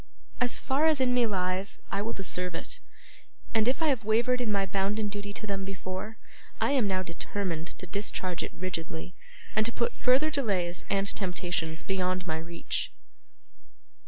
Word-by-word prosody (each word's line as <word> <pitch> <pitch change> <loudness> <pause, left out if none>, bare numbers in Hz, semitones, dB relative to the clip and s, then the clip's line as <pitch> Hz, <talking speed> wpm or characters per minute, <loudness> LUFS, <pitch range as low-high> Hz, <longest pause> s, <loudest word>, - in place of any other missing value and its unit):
As 245 -1 +2
far 285 +4 +3
as 310 -3 +4
in 255 -1 +4
me 245 -2 +5
lies, 185 -1 0
I 200 - +1
will 225 +3 -1
deserve 180 -2 -2
it, - - -4 0.7
and 220 0 +4
if 265 +6 +2
I 315 - +5
have 255 -5 +2
wavered 235 +4 +3
in 230 -3 +1
my 200 -1 +3
bounden 200 +2 +1
duty 205 0 -4
to 215 - -5
them 200 -2 -1
before, 190 +2 -4 0.4
I - - +3
am 260 -7 +4
now 185 -1 +1
determined 170 -1 -3
to - - -7
discharge 185 -2 -1
it - - -3
rigidly, 175 -1 -3 0.4
and 215 - +5
to - - 0
put 235 0 0
further 270 +5 +4
delays 195 - 0
and 195 0 +2
temptations 175 -4 -1
beyond 185 -1 0
my 160 -2 -1
reach. 170 +1 -2
195 Hz, 170 wpm, -30 LUFS, 180-230 Hz, 0.7 s, me